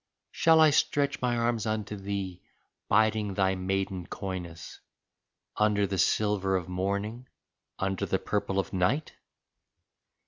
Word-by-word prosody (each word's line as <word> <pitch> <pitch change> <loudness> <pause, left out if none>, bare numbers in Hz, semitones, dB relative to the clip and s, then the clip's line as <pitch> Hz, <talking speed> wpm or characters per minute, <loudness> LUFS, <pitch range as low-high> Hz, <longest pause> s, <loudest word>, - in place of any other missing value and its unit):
Shall 165 -1 +4
I 155 -1 +7
stretch 140 -1 +1
my 120 -1 +1
arms 115 -2 0
unto 110 -1 -2
thee, 95 -2 -4 0.5
biding 110 -1 +2
thy 95 -1 +2
maiden 95 -1 -2
coyness, 90 -4 -6 0.8
Under 105 -1 +3
the 95 -1 -2
silver 95 +1 +2
of 90 -2 -2
morning, 100 +6 -3 0.5
under 95 -1 -1
the - - +1
purple 95 - -2
of 95 0 -1
night 95 - 0
100 Hz, 125 wpm, -28 LUFS, 95-110 Hz, 0.8 s, I